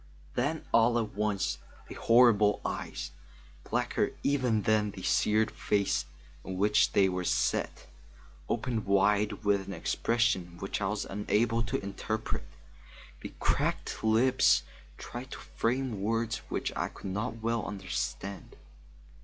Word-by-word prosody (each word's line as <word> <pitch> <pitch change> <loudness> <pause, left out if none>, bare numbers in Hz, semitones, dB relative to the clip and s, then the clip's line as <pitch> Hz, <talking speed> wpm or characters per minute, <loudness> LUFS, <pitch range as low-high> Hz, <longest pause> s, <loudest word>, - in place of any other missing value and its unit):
Then 145 +6 -1
all 115 +1 +5
at 110 -2 -2
once 105 -1 -1 0.3
the - - -8
horrible 115 -4 +5
eyes, - - -4 0.6
blacker - - 0
even 125 -7 +1
than 105 0 +2
the 95 -2 -9
seared 110 +1 +2
face 100 -6 0 0.4
in 95 0 -5
which 105 +2 +3
they 95 - +5
were 90 -1 -2
set, - - 0 0.6
opened 115 -3 -1
wide 100 +2 +2
with 100 -2 +2
an 100 - -5
expression 95 -1 0
which 95 +3 -4
I 95 - +1
was 105 +1 -2
unable 110 +3 +1
to 115 -3 -2
interpret. 110 +2 -3 0.8
The - - -7
cracked - - -1
lips 115 +4 +4 0.3
tried 125 +2 -7
to - - -6
frame 120 -3 -2
words 115 +2 0
which - - -2
I - - -1
could 95 - -7
not 110 +3 -3
well 115 -1 0
understand. 100 -1 -4
105 Hz, 130 wpm, -30 LUFS, 100-115 Hz, 0.8 s, all